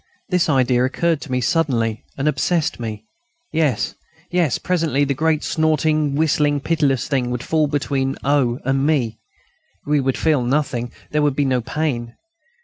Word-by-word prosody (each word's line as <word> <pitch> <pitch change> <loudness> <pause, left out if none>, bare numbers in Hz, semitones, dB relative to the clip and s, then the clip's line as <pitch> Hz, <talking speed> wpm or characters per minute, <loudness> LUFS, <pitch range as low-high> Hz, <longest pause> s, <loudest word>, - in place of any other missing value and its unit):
This 180 -3 +2
idea 130 -3 +3
occurred 160 +4 0
to 145 - -8
me 125 0 0
suddenly 115 -6 0
and 140 +2 -1
obsessed 160 0 0
me. 110 -3 -5 0.5
Yes, 150 -8 +1 0.4
yes, 175 -7 +2
presently 165 -6 0
the 140 -1 +1
great 155 +2 +1
snorting, 155 -2 +1
whistling, 150 -1 +2
pitiless 140 -4 0
thing 130 -3 0
would 125 -1 -3
fall 155 -2 +1
between 140 -2 -1
O. 135 -4 +2
and 135 +1 +1
me. 130 -7 0 0.7
We 150 -1 +2
should 135 -1 0
feel 155 -5 +2
nothing; 125 -2 -1 0.2
there 150 - +1
would 145 -2 +2
be 145 - +1
no 130 -2 +1
pain. 120 -4 -3
140 Hz, 155 wpm, -20 LUFS, 125-155 Hz, 0.7 s, idea